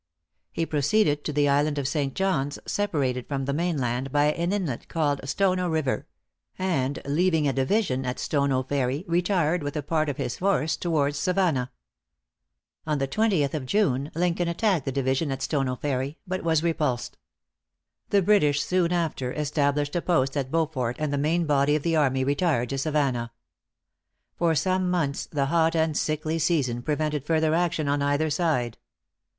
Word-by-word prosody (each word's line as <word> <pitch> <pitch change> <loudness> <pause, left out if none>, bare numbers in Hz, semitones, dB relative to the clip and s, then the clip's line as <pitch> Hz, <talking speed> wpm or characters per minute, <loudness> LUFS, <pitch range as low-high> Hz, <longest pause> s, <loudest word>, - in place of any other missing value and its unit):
He 165 - -1
proceeded 150 +1 +1
to - - -1
the 145 0 +2
island 145 +1 +2
of 140 -2 -1
St. 140 -2 -1
John's, 145 -8 0
separated 140 -11 -1
from 135 -2 -2
the 140 - -1
mainland 135 -6 -1
by 145 +1 +3
an 170 +2 -1
inlet 180 -12 -2
called 145 -4 0
Stono 185 +1 +1
River; 155 -5 -1 0.5
and 145 -8 0
leaving 160 +1 +2
a 135 - +1
division 135 - 0
at 125 -1 -3
Stono 140 -3 0
Ferry, 135 +4 -1
retired 175 -1 +1
with 145 +1 -4
a 150 - -2
part 155 +1 0
of 140 - -4
his 120 - -3
force 185 -5 +1
towards 145 -4 0
Savannah. 175 -8 +1 1.2
On 150 -1 +1
the 135 -1 -1
20th 185 -5 +1
of 145 -5 -3
June, 140 -7 +1
Lincoln 175 0 0
attacked 175 - +1
the 135 - -1
division 135 +2 0
at 135 - -3
Stono 135 -4 0
Ferry, 135 +2 -2
but 185 0 -3
was 160 -1 +2
repulsed. 150 -8 -1 0.9
The 200 -1 +3
British 150 -8 +3
soon 180 0 +1
after 160 -7 -1
established 145 0 0
a 175 - +1
post 135 -7 +1
at 135 -3 -1
Beaufort, 145 -6 -1
and 155 -2 -2
the - - +1
main 165 +4 +1
body 145 0 +3
of 150 - -1
the 165 -1 +1
army 135 -4 +2
retired 140 -3 +1
to 135 - -2
Savannah. 135 -6 0 1.0
For 170 -2 +1
some 185 +3 +1
months 155 -6 -1
the 140 -3 -1
hot 165 +3 +2
and 160 -1 +1
sickly 155 +2 -1
season 145 -7 +1
prevented 150 +1 -1
further 160 0 +1
action 170 -3 0
on 145 0 +1
either 145 +2 +1
side. 140 -9 0
150 Hz, 165 wpm, -26 LUFS, 135-170 Hz, 1.2 s, by